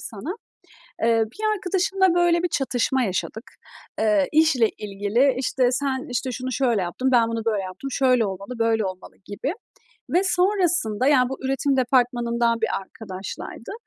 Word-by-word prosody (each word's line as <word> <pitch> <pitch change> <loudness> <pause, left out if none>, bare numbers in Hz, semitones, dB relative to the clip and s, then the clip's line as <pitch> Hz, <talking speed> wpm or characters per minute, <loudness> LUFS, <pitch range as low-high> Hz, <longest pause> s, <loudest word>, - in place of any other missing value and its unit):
sana. 255 - -6 0.7
Eee, 225 -1 +3
bir 430 - -1
arkadaşımla, 380 -1 +1
böyle 345 -1 +3
bir 355 - +1
çatışma 265 -2 0
yaşadık. 220 +4 -3 0.5
Eee, 210 -4 +2
işle 300 -8 +4
ilgili. 210 +6 0
İşte, 255 -1 +1
sen, 270 +2 -1
işte, 250 +1 -2
şunu 255 +2 -4
şöyle 240 -5 +1
yaptın, 185 +9 -2
ben 235 -2 +4
bunu 230 -1 -3
böyle 215 -4 0
yaptım, 185 +9 -7
şöyle 255 -4 +2
olmalı, 200 +5 -6
böyle 225 -1 +1
olmalı 185 -1 -7
gibi 205 +8 -4 0.6
ve 355 - +3
sonrasında, 355 - +1
yani, 255 -4 +4
bu 270 - -5
üretim 270 +1 0
departmanından 240 -2 +1
bir - - +1
arkadaşlaydı 195 - -8
250 Hz, 145 wpm, -23 LUFS, 220-280 Hz, 0.7 s, işle